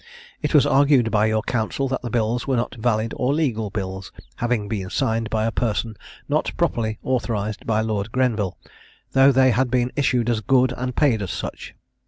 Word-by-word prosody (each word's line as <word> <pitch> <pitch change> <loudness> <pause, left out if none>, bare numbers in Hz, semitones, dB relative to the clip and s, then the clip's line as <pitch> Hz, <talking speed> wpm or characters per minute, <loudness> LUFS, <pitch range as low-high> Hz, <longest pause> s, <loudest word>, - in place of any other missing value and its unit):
It - - -1
was 145 - +6
argued 135 -4 +4
by 105 0 +3
your 110 0 0
counsel, 120 +3 -1
that 130 - -2
the 120 - -5
bills 115 +2 -1
were 135 - +1
not 120 0 -1
valid 115 -2 -1
or 130 +3 +1
legal 115 -9 -1
bills, 95 -2 -5 0.3
having 120 -3 -1
been 100 -4 -4
signed 115 +2 -1
by 110 0 0
a 115 - 0
person 115 -1 -1 0.3
not - - 0
properly 110 -2 0
authorised 110 -5 -2
by 110 -1 +2
Lord 110 -1 -2
Grenville, 115 -7 0 0.5
though 135 +1 +6
they 130 -1 +4
had 125 +2 +1
been 125 0 +1
issued 125 -4 +1
as 115 -3 0
good, 130 +2 +3
and 125 0 -4
paid 130 -8 +2
as 95 - -4
such. - - -6
115 Hz, 190 wpm, -22 LUFS, 110-130 Hz, 0.5 s, was